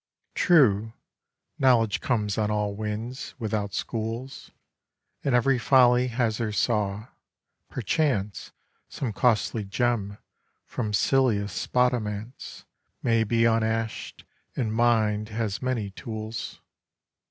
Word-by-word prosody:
True, 115 - +4 0.7
knowledge 120 -5 +3
comes 105 -5 0
on 105 -2 0
all 105 -1 -1
winds, 110 +5 -5
without 105 -4 -2
schools, 115 +4 -4 0.7
And 135 -3 +2
every 130 +1 +3
folly 125 0 +5
has 115 -2 -1
her 115 -2 -1
saw: 105 0 -1 0.6
perchance 120 -5 -1 0.4
Some 120 -6 -4
costly 110 -1 +1
gem 105 -1 -1 0.5
from 110 -4 -3
silliest 105 -3 +2
spodomance 120 -2 -2 0.4
May 115 -1 +3
be 115 +1 +2
unash'd; 115 0 -1 0.3
and 110 -5 -1
mind 110 -2 +2
has 110 -2 -3
many 120 -6 -2
tools. 110 +2 -6
115 Hz, 100 wpm, -26 LUFS, 105-125 Hz, 0.7 s, folly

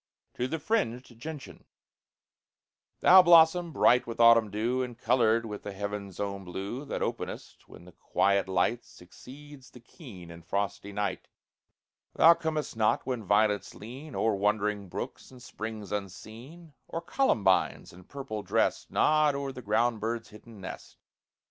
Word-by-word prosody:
TO 125 - -2
THE 160 - -3
FRINGED 125 - -2
GENTIAN 150 +2 -9 1.4
Thou 185 +1 +9
blossom, 170 0 +5
bright 125 -4 +3
with 115 0 -7
autumn 115 -2 +6
dew, 115 +5 -1
And 125 -2 -5
colored 115 -1 +2
with 105 -2 -7
the 100 - -7
heaven's 100 -1 -6
own 100 -1 -4
blue, 100 +9 -6
That - - -3
openest - - -6
when 85 - -14
the 90 - -14
quiet 100 +3 0
light 95 +6 0
Succeeds 130 +6 -14
the 125 - -15
keen 115 - -13
and 85 0 -12
frosty 100 +3 -3
night; 100 -2 -3 0.9
Thou 165 +2 +7
comest 160 -5 -3
not 110 -1 +1
when 125 -4 -3
violets 105 +1 +1
lean 130 +8 -10
O'er 110 - +1
wandering 105 0 -1
brooks - - -7
and 130 - -14
springs 110 -4 -7
unseen, 115 - -8
Or 165 - -5
columbines, 105 - +1
in 90 +1 -15
purple 135 -7 -6
dressed, - - 0
Nod 155 -2 +3
o'er 140 -1 -3
the 125 - -9
ground 115 +1 +1
bird's 115 0 -4
hidden 105 0 -14
nest. - - -9
115 Hz, 150 wpm, -28 LUFS, 100-135 Hz, 1.4 s, Thou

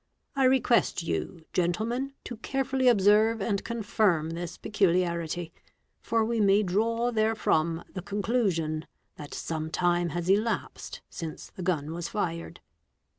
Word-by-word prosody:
I 270 -1 +3
request 255 -8 +3
you, 165 0 -3
gentlemen, 225 +10 0
to 240 - -7
carefully 265 +2 0
observe 215 0 +5
and 200 0 -1
confirm 205 -8 +1
this 170 0 -5
peculiarity, 175 -4 0 0.5
for 225 -1 +1
we 230 0 -1
may 200 +1 +5
draw 230 +5 +1
therefrom 215 -7 +1
the 185 - -4
conclusion 190 -6 -1 0.3
that 145 -1 -8
some 160 -1 -3
time 175 0 +1
has 170 +2 -3
elapsed 210 +4 -1
since 160 -3 -7
the - - -9
gun 160 -4 -1
was 170 0 -4
fired. 170 -5 -3
195 Hz, 125 wpm, -28 LUFS, 170-225 Hz, 0.5 s, observe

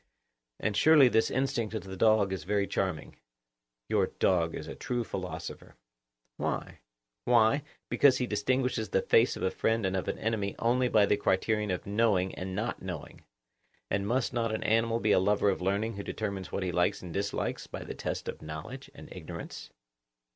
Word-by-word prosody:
And 110 -2 -1
surely 150 -2 +7
this 110 -1 +2
instinct 125 -5 -1
of 105 - -3
the 95 0 -7
dog 105 -1 +3
is 90 -5 -4
very 100 +3 +1
charming;—your - - -4
dog 85 -3 +2
is - - -6
a - - -6
true 120 -1 -2
philosopher. 95 -4 -6 0.6
Why? - - -3 0.5
Why, 120 +3 +4 0.3
because 135 -3 +4
he 125 - 0
distinguishes 120 +1 0
the 95 - +1
face 115 +3 +4
of - - -6
a 95 - +1
friend 115 -2 0
and 95 0 0
of 95 - -2
an - - -2
enemy 105 -3 -2
only 125 +2 +2
by 105 -3 +5
the 105 - +2
criterion 105 +2 +1
of 90 -1 -2
knowing 100 -3 +1
and 95 0 -5
not 110 +5 -3
knowing. 90 -5 -7 0.7
And 100 0 0
must 125 +3 0
not 115 -2 0
an 110 - -2
animal 115 +1 +2
be 110 -2 +1
a - - +5
lover 100 +1 +3
of 95 - -4
learning 100 +3 -1
who 100 - -4
determines 100 -4 -4
what 100 - -2
he 90 - -1
likes 90 +1 +1
and 90 -2 -7
dislikes 100 +1 -2
by - - -7
the - - -6
test - - -4
of - - -5
knowledge 90 - -8
and 140 - -11
ignorance? 90 -4 -8
105 Hz, 185 wpm, -30 LUFS, 95-115 Hz, 0.7 s, surely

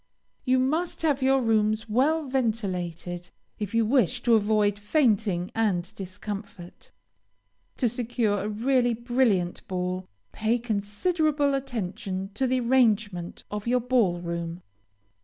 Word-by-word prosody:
You 255 -1 +3
must 315 +7 0
have 290 -4 +2
your 265 0 +3
rooms 215 -1 +1
well 290 +8 +2
ventilated 185 -8 -2 0.3
if 210 +1 -4
you 230 -1 +3
wish 245 0 +2
to 235 - +4
avoid 210 -1 +3
fainting 210 - +1
and 190 -6 0
discomfort. 195 -1 -8 0.9
To 250 - +2
secure 230 -3 0
a 205 - -3
really 240 +2 +2
brilliant 235 -7 0
ball, 185 0 -3 0.2
pay 220 +2 +1
considerable 280 - 0
attention 200 -7 -3
to 260 +5 0
the 255 0 +1
arrangement 215 -8 +1
of 210 +1 -4
your 250 +1 +3
ball 235 -8 +2
room. 170 0 -5
220 Hz, 120 wpm, -26 LUFS, 195-255 Hz, 0.9 s, to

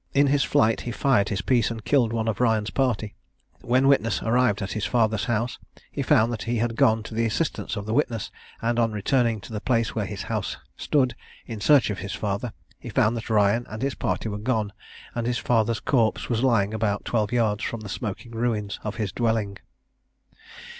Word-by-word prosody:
In 140 +1 +5
his 140 -2 +3
flight 110 +1 +2
he 120 - -4
fired 120 -5 +2
his 100 -2 -2
piece, 120 0 +2
and 115 -2 -6
killed 125 -6 +3
one 115 -1 -1
of 110 0 -1
Ryan's 110 -3 +2
party. 120 -6 0 0.5
When 130 +2 +2
witness 115 -7 +3
arrived 115 -3 +2
at 95 - -4
his 110 - -3
father's 110 -3 +1
house, 120 +1 -1 0.3
he - - -3
found 115 +2 +3
that 110 - -5
he 120 - +1
had 115 0 0
gone 110 -1 +3
to 115 - -9
the 115 +1 +1
assistance 150 +5 -2
of 100 -1 -5
the 110 - -2
witness; 120 -5 0 0.3
and 120 +1 +1
on 115 -2 +2
returning 115 +2 +1
to 110 - -10
the 105 - -3
place 115 -3 +1
where 105 -3 -2
his 95 -1 -5
house 110 -3 -3 0.2
stood, 130 -5 +1 0.3
in 110 -3 -7
search 135 0 +5
of 100 - -4
his 100 +1 -5
father, 105 +3 -2 0.3
he - - -8
found 110 +3 +2
that 115 0 -5
Ryan 110 +2 +2
and 110 +4 -5
his 140 0 0
party - - -2
were 105 -1 -4
gone, 110 -2 -1 0.4
and 120 -1 -2
his 120 -1 0
father's 115 -2 +1
corpse 115 -5 +1
was 115 -2 0
lying 115 -5 +2
about 105 -2 -1
twelve 110 -2 0
yards 110 -4 +1
from 115 - -3
the 105 - -8
smoking 105 +3 -5
ruins 115 -3 -2
of 105 0 -4
his 105 -4 -2
dwelling. 110 -4 0
115 Hz, 210 wpm, -25 LUFS, 105-120 Hz, 0.5 s, In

